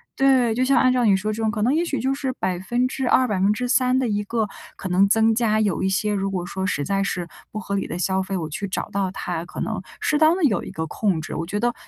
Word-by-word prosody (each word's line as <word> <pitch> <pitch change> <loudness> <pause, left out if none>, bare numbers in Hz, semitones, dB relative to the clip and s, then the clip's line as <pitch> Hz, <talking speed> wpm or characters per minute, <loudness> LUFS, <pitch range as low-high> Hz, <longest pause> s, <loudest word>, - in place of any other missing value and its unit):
对。 260 -4 +3
就 250 - +1
像 270 +1 +3
按 255 -1 +4
照 250 -1 +2
你 200 -2 +5
说 215 +3 -2
这 225 - -4
种， 220 - +1
可 215 -1 -1
能 250 +5 +3
也 330 +3 +2
许 280 -7 -2
就 265 +3 0
是 270 -1 -2
2%、 245 +7 0
3% 245 +6 +2
的 260 -1 +1
一 205 -1 -1
个 220 0 -1 0.3
可 190 - -6
能 190 +2 +4
增 225 +2 +3
加 220 -2 +2
有 200 -6 0
一 190 - +1
些 205 +2 0
如 195 -1 -1
果 185 -2 -3
说 190 +1 -4
实 145 -7 -1
在 195 +3 0
是 180 -3 -3 0.2
不 215 - -4
合 200 - -5
理 195 - -2
的 170 - -4
消 190 +1 0
费， 190 0 -3
我 160 - -3
去 200 +6 -4
找 190 - -4
到 195 -1 0
它， 175 -3 -4
可 - - -9
能 - - -2 0.2
适 300 - +1
当 320 +3 +5
地 330 - +4
有 205 -8 -1
一 - - -7
个 160 - -4
控 175 0 -1
制。 155 - -7
我 165 - -3
觉 205 +4 -3
得 240 +1 +1
210 Hz, 280 characters per minute, -23 LUFS, 190-250 Hz, 0.3 s, 你